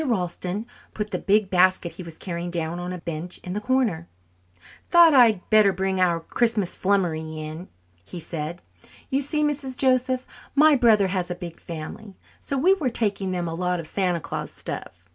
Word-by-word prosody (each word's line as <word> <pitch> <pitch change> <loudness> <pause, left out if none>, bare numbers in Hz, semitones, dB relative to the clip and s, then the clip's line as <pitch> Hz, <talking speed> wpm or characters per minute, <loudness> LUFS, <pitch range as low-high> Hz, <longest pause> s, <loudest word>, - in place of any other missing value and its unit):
Ralston 190 - -2 0.3
put 210 -1 -3
the 180 - -2
big 200 0 +2
basket 185 -1 +3
he - - -9
was 165 -2 -9
carrying 175 -1 -4
down 170 0 -3
on 180 0 -4
a 180 - -4
bench 170 +1 -5
in 180 - -5
the 210 - -3
corner. 220 -9 0 0.8
"Thought 340 -2 +7
I'd 230 -8 +5
better 215 -2 +6
bring 190 0 -1
our 170 -2 +3
Christmas 215 +2 0
flummery 165 -5 0
in," 155 +3 -7 0.4
he 135 - -8
said. 165 +1 -5 0.5
"You 270 +1 +2
see, 300 +2 -1
Mrs. 275 -3 -2
Joseph, 255 -1 +1 0.3
my 305 +1 +6
brother 220 -6 +4
has 185 -2 -2
a 175 - -3
big 170 -1 -8
family, 175 +5 -8 0.3
so 275 - -3
we 365 +8 +4
are 265 - +2
taking 205 -5 -1
them 175 -2 -2
a 165 - -4
lot 180 +1 -1
of 165 - -5
Santa 180 +1 0
Claus - - -5
stuff. - - -7
185 Hz, 180 wpm, -24 LUFS, 170-235 Hz, 0.8 s, Thought